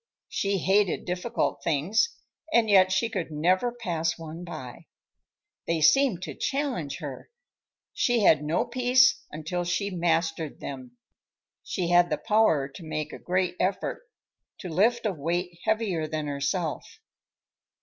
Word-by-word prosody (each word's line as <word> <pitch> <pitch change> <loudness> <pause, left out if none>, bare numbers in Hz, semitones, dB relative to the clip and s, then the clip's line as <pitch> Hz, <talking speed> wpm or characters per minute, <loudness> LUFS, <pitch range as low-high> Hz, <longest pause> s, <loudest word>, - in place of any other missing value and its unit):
She 200 0 0
hated 195 0 +2
difficult 180 +7 -2
things, 170 - +2 0.4
and 230 -6 +3
yet 185 -1 +6
she 190 +5 +2
could 190 -8 -4
never 180 +10 +1
pass 170 -9 -2
one 165 +1 -8
by. 155 -8 -9 0.8
They 165 -1 +1
seemed 180 - +4
to 155 -5 -5
challenge 270 - -2
her; 140 -4 -7 0.6
she 240 -2 +2
had 155 -7 +5
no 155 +3 0
peace 255 +3 +3
until 165 +4 -3
she 175 +4 -1
mastered 165 -3 -1
them. 130 -3 -8 0.6
She 175 -2 -3
had 175 0 +5
the 150 - 0
power 160 -6 +2
to 140 +5 -12
make 155 -1 -4
a - - -8
great 180 0 0
effort, 190 - -1 0.6
to 185 - -7
lift 225 +8 +2
a 210 - +1
weight 170 +3 -3
heavier 215 -8 0
than 155 -1 -3
herself. 145 +4 -3
175 Hz, 140 wpm, -27 LUFS, 155-205 Hz, 0.8 s, yet